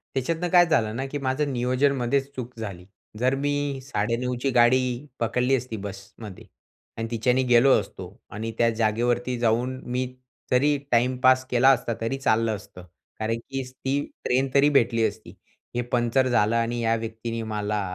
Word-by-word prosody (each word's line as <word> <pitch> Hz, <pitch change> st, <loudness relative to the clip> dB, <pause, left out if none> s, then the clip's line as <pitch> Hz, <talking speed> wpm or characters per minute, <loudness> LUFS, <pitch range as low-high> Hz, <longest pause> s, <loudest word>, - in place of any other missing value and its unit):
त्याच्यातनं 165 Hz, +7 st, -1 dB
काय 175 Hz, 0 st, +6 dB
झालं 110 Hz, -9 st, +1 dB
ना, 135 Hz, +3 st, -2 dB
की 145 Hz, +2 st, -4 dB
माझं 140 Hz, +2 st, -1 dB
नियोजनमध्येच 130 Hz, +2 st, +1 dB
चूक 125 Hz, -1 st, -7 dB
झाली. 95 Hz, -5 st, -6 dB, 0.3 s
जर 130 Hz, +2 st, +2 dB
मी 145 Hz, -1 st, -1 dB
9:30 125 Hz, 0 st, -1 dB
ची 135 Hz, -, +1 dB
गाडी 125 Hz, +2 st, +3 dB
पकडली 125 Hz, +3 st, +1 dB
असती 125 Hz, -3 st, -4 dB
बसमध्ये 100 Hz, 0 st, -9 dB, 0.5 s
आणि 115 Hz, -, -3 dB
तिच्यानी 125 Hz, +3 st, +1 dB
गेलो 125 Hz, +2 st, +5 dB
असतो 95 Hz, -, -8 dB, 0.3 s
आणि 110 Hz, +2 st, -4 dB
त्या 115 Hz, -, +3 dB
जागेवरती 120 Hz, +3 st, 0 dB
जाऊन 120 Hz, +3 st, 0 dB
मी 130 Hz, +1 st, 0 dB, 0.5 s
जरी 145 Hz, +3 st, +3 dB
टाईमपास 130 Hz, +2 st, +3 dB
केला 125 Hz, +2 st, +4 dB
असता, 125 Hz, -3 st, +2 dB
तरी 115 Hz, +4 st, -1 dB
चाललं 115 Hz, -4 st, +1 dB
असतं. 90 Hz, -3 st, -12 dB, 0.3 s
कारण 110 Hz, +1 st, -1 dB
की 135 Hz, 0 st, -3 dB
ती 130 Hz, +2 st, -3 dB, 0.2 s
ट्रेन 130 Hz, +2 st, +1 dB
तरी 140 Hz, +1 st, +5 dB
भेटली 115 Hz, -5 st, +2 dB
असती. 110 Hz, +1 st, -9 dB, 0.4 s
हे 120 Hz, -, +1 dB
पंचर 120 Hz, +2 st, +2 dB
झालं 115 Hz, -2 st, +2 dB
आणि 115 Hz, +1 st, 0 dB
या 115 Hz, 0 st, +2 dB
व्यक्तीने 115 Hz, 0 st, -5 dB
मला 105 Hz, 0 st, -1 dB
125 Hz, 155 wpm, -25 LUFS, 115-130 Hz, 0.5 s, काय